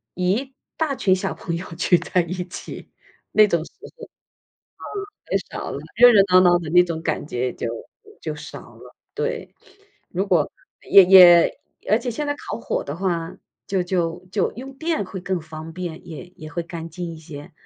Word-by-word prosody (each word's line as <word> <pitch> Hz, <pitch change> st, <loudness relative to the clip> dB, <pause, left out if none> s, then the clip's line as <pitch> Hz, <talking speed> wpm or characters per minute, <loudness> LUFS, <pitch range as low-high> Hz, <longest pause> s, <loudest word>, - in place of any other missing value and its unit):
一 210 Hz, +10 st, -1 dB, 0.2 s
大 305 Hz, -4 st, 0 dB
群 190 Hz, -6 st, +2 dB
小 185 Hz, -, -3 dB
朋 170 Hz, -2 st, -5 dB
友 180 Hz, -, -7 dB
聚 175 Hz, 0 st, +3 dB
在 180 Hz, -, 0 dB
一 170 Hz, +2 st, -5 dB
起 -, -, -9 dB, 0.4 s
那 215 Hz, 0 st, +7 dB
种 170 Hz, -4 st, 0 dB
时 -, -, -15 dB, 0.3 s
候， 465 Hz, -, -9 dB
嗯， -, -, -23 dB, 1.2 s
很 -, -, +1 dB
少 -, -, -5 dB
了。 -, -, -4 dB, 0.2 s
热 245 Hz, 0 st, +9 dB
热 200 Hz, -2 st, +7 dB
闹 185 Hz, -, +8 dB
闹 175 Hz, -1 st, +5 dB
的 160 Hz, -3 st, -6 dB
那 180 Hz, +1 st, +7 dB
种 165 Hz, -2 st, -5 dB
感 155 Hz, -2 st, -2 dB
觉 125 Hz, -2 st, -2 dB
就 -, -, -5 dB, 0.6 s
就 -, -, -3 dB
少 -, -, -9 dB, 0.2 s
了， -, -, -15 dB, 0.2 s
对。 465 Hz, +1 st, -4 dB, 0.6 s
如 190 Hz, +3 st, -1 dB
果 170 Hz, -6 st, +2 dB, 0.4 s
也 195 Hz, -1 st, +9 dB
也 180 Hz, -2 st, +8 dB, 0.3 s
而 215 Hz, -, +5 dB
且 245 Hz, +1 st, -4 dB
现 295 Hz, +6 st, -3 dB
在 290 Hz, -, -1 dB
烤 -, -, -6 dB
火 -, -, -2 dB
的 140 Hz, +3 st, -5 dB
话， 170 Hz, -3 st, -2 dB, 0.3 s
就 190 Hz, -2 st, 0 dB
就 175 Hz, 0 st, -2 dB
就 200 Hz, -, +1 dB
用 265 Hz, +4 st, -8 dB
电 320 Hz, -9 st, -1 dB
会 190 Hz, 0 st, -7 dB
更 185 Hz, 0 st, -2 dB
方 160 Hz, +1 st, -9 dB
便， 175 Hz, -1 st, -7 dB
也 160 Hz, +2 st, -8 dB
也 155 Hz, -1 st, -10 dB
会 170 Hz, -, -2 dB
干 165 Hz, 0 st, -7 dB
净 170 Hz, 0 st, -6 dB
一 -, -, -11 dB
些。 150 Hz, -2 st, -11 dB
180 Hz, 205 characters per minute, -22 LUFS, 165-200 Hz, 1.2 s, 热